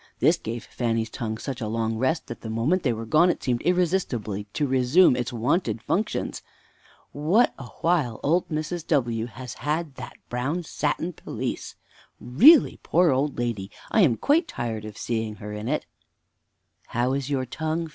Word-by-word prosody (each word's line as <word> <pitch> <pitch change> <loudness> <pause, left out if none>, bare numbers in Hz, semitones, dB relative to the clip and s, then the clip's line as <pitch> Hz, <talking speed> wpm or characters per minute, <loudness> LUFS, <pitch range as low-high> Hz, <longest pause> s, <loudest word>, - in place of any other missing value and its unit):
This - - +4
gave 115 +1 -5
Fanny's 115 -2 -2
tongue 110 -2 -4
such 130 +1 -5
a 110 - -2
long 115 0 -1
rest 130 +8 0
that 120 - -8
the 110 - -6
moment 120 +12 +1
they 130 - +1
were 115 0 -4
gone 155 +10 +4
it - - -1
seemed 120 -2 0
irresistibly 165 - 0
to 110 +8 -2
resume 130 +4 +4
its 125 -1 -2
wonted 120 +5 0
functions. 210 - -2 0.7
Fanny. 145 - -7
What 225 +7 +5
a 130 - -8
while 155 -10 +1
old 170 +5 +2
Mrs. 155 +1 -3
W. 120 -6 +1
has 120 +1 -8
had 155 0 -2
that - - -8
brown 140 +9 -2
satin 160 +3 -2
pelisse! - - -5 0.4
Really, 250 - +6
poor 170 -1 +3
old 135 +2 0
lady, 115 -5 -2 0.2
I 220 - +4
am 130 - +4
quite 320 +4 +2
tired 115 - -4
of 105 -1 -9
seeing 110 -2 -2
her 105 +1 -8
in 105 +2 -5
it! - - -1
Mother. 120 - -14
How 125 +2 +2
is 140 0 -2
your 135 -2 0
tongue, 160 +5 -2
Fanny? - - -9
130 Hz, 180 wpm, -25 LUFS, 115-165 Hz, 0.7 s, Really